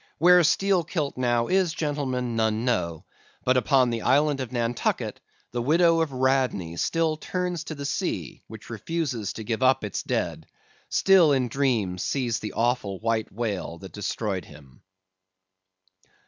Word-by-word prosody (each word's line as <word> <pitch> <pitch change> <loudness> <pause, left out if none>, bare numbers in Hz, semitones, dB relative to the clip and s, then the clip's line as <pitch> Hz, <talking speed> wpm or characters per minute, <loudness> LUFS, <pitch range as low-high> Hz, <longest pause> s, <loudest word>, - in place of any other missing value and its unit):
"Where 180 +2 +6
Steelkilt 170 -4 +1
now 120 -2 +1
is, 185 -1 +1
gentlemen, 130 -6 -2
none 110 +1 0
know; 85 -10 -1 0.4
but 130 - +3
upon 130 -1 +3
the 115 -1 -2
island 145 +1 +2
of 130 -3 -4
Nantucket, 120 -1 -1 0.3
the 120 - -2
widow 165 +5 +4
of 160 -3 -1
Radney 130 -10 0
still 160 - 0
turns 180 0 -3
to 155 - -6
the 140 -1 -6
sea 140 - -3
which - - -11
refuses 145 - -3
to 110 - -7
give 115 +2 -3
up 130 -2 +3
its 105 - -3
dead; - - -3 0.4
still 190 -6 +5
in 130 -3 +1
dreams 115 -9 0
sees 120 -5 -1
the 105 - -6
awful 115 -4 0
white 115 0 -1
whale 100 -6 -3
that 95 +2 -11
destroyed 105 -2 -3
him. 70 -3 -16
125 Hz, 145 wpm, -25 LUFS, 110-155 Hz, 0.4 s, Where